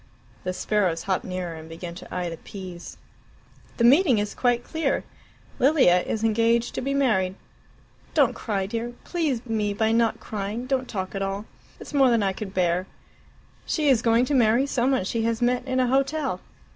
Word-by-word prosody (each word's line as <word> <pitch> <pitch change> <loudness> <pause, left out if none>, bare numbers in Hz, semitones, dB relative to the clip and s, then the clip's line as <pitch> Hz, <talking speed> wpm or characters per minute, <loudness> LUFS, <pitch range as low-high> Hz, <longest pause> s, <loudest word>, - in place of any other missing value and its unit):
The 185 - 0
sparrows 185 -3 0
hopped 190 -2 -1
nearer 185 -2 -4
and 160 0 -10
began 170 +1 -7
to 175 - -11
eye 180 -1 -2
the 165 -1 -5
peas. 185 -1 -9 0.8
"The 235 - +1
meaning 270 - +6
is 205 0 -1
quite 245 -1 +1
clear 320 +4 -1 0.6
Lilia 260 - +5
is 220 +3 -3
engaged 230 +1 +2
to - - -3
be 275 +2 -1
married. 190 -9 +2 0.8
Don't - - +4
cry, 200 -4 -2
dear; 230 +4 -4
please 295 -9 -1
me 215 -3 -1
by 220 +1 +1
not 230 0 +2
crying 210 +3 -4
don't 260 -1 -1
talk 190 -3 -4
at 195 - -3
all. 195 +2 -3 0.3
It's - - -10
more 270 -3 +5
than 230 -3 +3
I 195 -1 +1
could 195 0 -6
bear. 180 -1 0 0.8
She 300 -3 +1
is 250 -4 +4
going 230 +1 +3
to 285 - -2
marry 240 0 +4
some 260 -2 +1
one 265 -7 +2
she 225 +4 -2
has 230 -1 0
met 245 +1 +1
in 260 0 0
a 255 - +3
hotel. 270 -4 0
225 Hz, 185 wpm, -25 LUFS, 190-255 Hz, 0.8 s, meaning